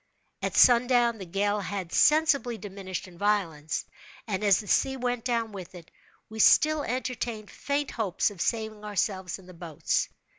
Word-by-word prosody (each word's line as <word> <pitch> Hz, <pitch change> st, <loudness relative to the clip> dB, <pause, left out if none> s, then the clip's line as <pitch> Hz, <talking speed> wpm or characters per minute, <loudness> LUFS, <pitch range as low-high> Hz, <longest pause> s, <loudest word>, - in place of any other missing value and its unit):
At -, -, -2 dB
sundown, 240 Hz, -2 st, +5 dB
the 190 Hz, -, -8 dB
gale 205 Hz, +4 st, 0 dB
had 190 Hz, -3 st, -5 dB
sensibly 295 Hz, -6 st, +3 dB
diminished 190 Hz, -3 st, -7 dB
in 175 Hz, -2 st, -15 dB
violence, 170 Hz, -7 st, -1 dB, 0.4 s
and 210 Hz, -3 st, -3 dB
as 200 Hz, -3 st, +4 dB
the 210 Hz, -, -8 dB
sea 265 Hz, +5 st, +2 dB
went 245 Hz, -2 st, -2 dB
down 230 Hz, -3 st, -1 dB
with 190 Hz, -2 st, -9 dB
it, 170 Hz, -2 st, -13 dB, 0.4 s
we 220 Hz, 0 st, -9 dB
still 310 Hz, +6 st, +5 dB
entertained 245 Hz, -4 st, -4 dB
faint 285 Hz, 0 st, -2 dB
hopes 205 Hz, -2 st, 0 dB
of 190 Hz, -4 st, -8 dB
saving 220 Hz, -2 st, -2 dB
ourselves 195 Hz, -3 st, -2 dB
in 190 Hz, -, -17 dB
the 185 Hz, -, -13 dB
boats. 165 Hz, -3 st, -2 dB
210 Hz, 160 wpm, -27 LUFS, 190-245 Hz, 0.4 s, sundown